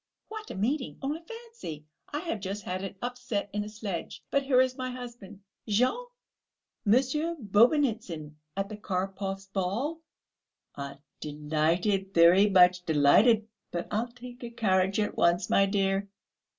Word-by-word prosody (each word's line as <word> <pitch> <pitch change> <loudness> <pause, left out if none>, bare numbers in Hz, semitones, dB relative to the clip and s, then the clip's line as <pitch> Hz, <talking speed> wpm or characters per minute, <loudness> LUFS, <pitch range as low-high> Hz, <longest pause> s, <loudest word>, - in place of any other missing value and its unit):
What 435 0 -7
a - - -6
meeting! 255 +8 -1
Only 295 +4 -2
fancy, 455 - -9 0.3
I 295 - -2
have 330 -11 -3
just 195 +1 -4
had 185 +1 -3
an 195 - -5
upset 245 -5 -3
in 205 0 -1
a 210 - -7
sledge... 210 -5 -5
but 280 - +3
here 270 -2 +3
is 255 0 +3
my 255 -1 -3
husband! 240 -5 -9 0.3
Jean! 255 - +1 0.8
Monsieur 270 +9 +2
Bobynitsyn, 215 - +2 0.2
at 195 0 0
the 215 0 -7
Karpovs' 195 0 -3
ball...." 230 - -1 0.7
"Ah, 140 0 -6 0.2
delighted, 160 +6 0
very 175 +5 +7
much 180 -2 +5
delighted!... 175 - +5 0.2
But 175 0 -4
I'll 220 +3 0
take 245 +1 -11
a 240 - -4
carriage 195 -4 +1
at 210 - 0
once, 175 +1 +2
my 195 - +5
dear." 195 0 0
205 Hz, 145 wpm, -29 LUFS, 185-250 Hz, 0.8 s, very